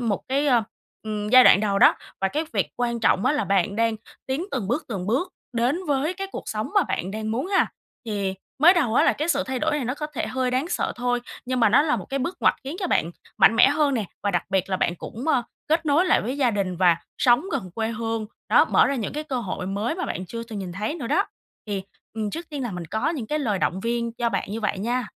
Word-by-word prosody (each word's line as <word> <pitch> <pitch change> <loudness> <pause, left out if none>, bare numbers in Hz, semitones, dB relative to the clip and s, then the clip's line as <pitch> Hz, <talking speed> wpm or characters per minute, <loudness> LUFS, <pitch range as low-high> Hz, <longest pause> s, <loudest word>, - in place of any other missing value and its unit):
một 225 -5 -1
cái, 280 +3 +1
ơ, 245 -5 +4 0.4
ừm, 210 -1 -3
giai 255 +3 +8
đoạn 200 - +7
đầu 200 -2 +1
đó - - +7 0.3
và 195 - +2
cái 305 +10 -2
việc - - +1
quan 235 -1 -1
trọng 215 -1 +3
á. 260 - +4
Là 295 - 0
bạn 195 0 +1
đang 230 0 +1 0.3
tiến 265 +6 -2
từng 230 -8 -3
bước 285 +7 0
từng 195 -6 -4
bước 275 - 0 0.2
đến 245 +8 +1
với 290 +4 0
cái 390 +1 -4
cuộc - - -5
sống 215 0 -3
mà - - +5
bạn 185 - -3
đang 215 +1 -4
muốn 245 +8 -1
ha. 390 - +3 0.4
Thì 200 -3 -2 0.2
mới 340 +6 +7
đầu 270 -10 +1
á - - +5
là - - +4
cái 305 +3 -3
sự - - +2
thay 260 -1 -2
đổi - - +1
này 285 - -2
nó 250 +2 -2
có 300 +1 -4
thể 300 - -4
hơi 260 -1 -1
đáng 260 +6 0
sợ - - -1
thôi 245 0 0 0.3
nhưng 255 -1 -1
mà 225 - +6
nó 240 +7 +5
là 300 -1 +1
một - - -6
cái 275 - -1
bước 340 +8 -3
ngoặt - - +4
khiến 280 +5 -5
cho 365 - 0
bạn 170 - +1 0.3
mạnh 225 - +6
mẽ 240 - +7
hơn 290 -1 +2
nè 225 -4 0 0.2
và 205 - +1
đặc 175 -3 0
biệt 190 0 0
là 185 - +1
bạn 175 - 0
cũng, 240 - -6
ơ, 265 -6 +3 0.3
kết 320 +1 +1
nối 295 +5 +4
lại - - +4
với 255 +5 -3
gia 260 -4 +3
đình 195 -4 -2
và 175 -2 +4 0.2
sống 245 +5 +4
gần 185 - -3
quê 225 -1 -1
hương. 225 -1 -3 0.2
Đó, - - +6
mở - - +4
ra 280 - 0
những 225 -7 -3
cái 300 +1 -4
cơ 265 -5 -2
hội 185 -4 -4
mới 205 +8 -1
mà 365 - -3
bạn 185 - -4
chưa 230 +6 -6
từng 225 -3 -7
nhìn 185 -3 -5
thấy 210 - -3
nữa 295 -8 -5
đó. - - +2 0.4
Thì, 200 -2 -3 0.3
ừm, 215 -2 -2
trước 335 +7 -6
tiên 290 -3 -4
là 240 - -3
mình 180 -2 -5
có 220 +7 -1
những 275 -9 -4
cái 300 +6 -1
lời 220 -9 0
động 185 +1 0
viên 235 +1 -1
cho 235 0 -1
bạn 195 -3 -2
như 225 +2 -3
vậy 210 -2 -1
nha. 240 +4 -1
235 Hz, 275 wpm, -24 LUFS, 205-280 Hz, 0.4 s, giai